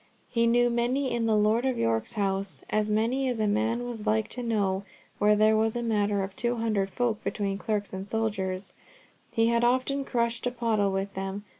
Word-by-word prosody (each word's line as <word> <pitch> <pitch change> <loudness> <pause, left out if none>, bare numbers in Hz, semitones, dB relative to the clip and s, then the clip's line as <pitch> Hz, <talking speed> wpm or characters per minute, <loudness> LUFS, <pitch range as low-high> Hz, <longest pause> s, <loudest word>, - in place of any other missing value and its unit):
He 235 -1 +2
knew 240 +1 +3
many 250 +3 0
in 235 -1 0
my 220 - +3
Lord 215 +3 +3
of 260 -2 0
York's 115 - 0
house—as 200 +1 -1
many 235 +5 +1
as 245 -3 -2
a 215 - +2
man 225 +3 0
was 225 -3 -6
like 215 0 +1
to 250 - -5
know 200 -5 0 0.4
where 210 +1 +5
there 215 +1 +4
was 220 +1 +1
a 240 - -2
matter 205 -3 +1
of 190 0 -6
two 240 0 0
hundred 215 -4 0
folk 225 +2 -1
between 200 -2 -2
clerks 210 -3 -2
and 190 0 -4
soldiers, 195 -3 -2 0.6
he 225 0 +2
had 235 0 +2
often 260 +3 +1
crushed 235 -2 -1
a - - 0
pottle 225 -5 +1
with 195 +1 -2
them. 195 +1 -4
220 Hz, 195 wpm, -27 LUFS, 200-235 Hz, 0.6 s, where